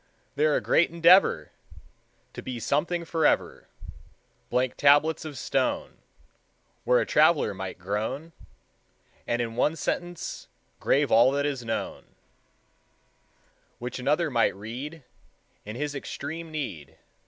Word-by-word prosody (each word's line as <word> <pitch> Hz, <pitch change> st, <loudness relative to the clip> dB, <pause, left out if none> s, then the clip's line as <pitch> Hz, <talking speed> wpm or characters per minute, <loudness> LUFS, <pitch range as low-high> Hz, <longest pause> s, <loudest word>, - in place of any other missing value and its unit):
They're 150 Hz, +1 st, +2 dB
a -, -, +1 dB
great 170 Hz, -, +3 dB
endeavor 170 Hz, -, +4 dB, 0.8 s
To -, -, -7 dB
be 125 Hz, -2 st, -5 dB
something 170 Hz, +8 st, -1 dB
forever; 160 Hz, -2 st, 0 dB, 0.8 s
Blank 125 Hz, +1 st, 0 dB
tablets 145 Hz, +3 st, +4 dB
of 150 Hz, -3 st, -7 dB
stone, -, -, -1 dB, 0.9 s
Where -, -, +4 dB
a -, -, 0 dB
traveler 150 Hz, -11 st, +3 dB
might 95 Hz, -1 st, -6 dB
groan, 110 Hz, -, -4 dB, 1.0 s
And 120 Hz, 0 st, 0 dB
in 115 Hz, -1 st, -6 dB
one 150 Hz, +6 st, +1 dB
sentence 175 Hz, +1 st, -4 dB, 0.3 s
Grave 140 Hz, 0 st, +2 dB
all 120 Hz, +3 st, +6 dB
that 145 Hz, 0 st, 0 dB
is 140 Hz, -4 st, -2 dB
known 115 Hz, -1 st, -5 dB, 1.6 s
Which 125 Hz, +1 st, -6 dB
another 150 Hz, +5 st, +1 dB
might 120 Hz, -2 st, +2 dB
read, 130 Hz, +10 st, -7 dB, 0.6 s
In 105 Hz, +1 st, -7 dB
his 145 Hz, +3 st, -3 dB
extreme 155 Hz, +4 st, -6 dB
need. 130 Hz, -, -6 dB
140 Hz, 120 wpm, -26 LUFS, 120-160 Hz, 1.6 s, all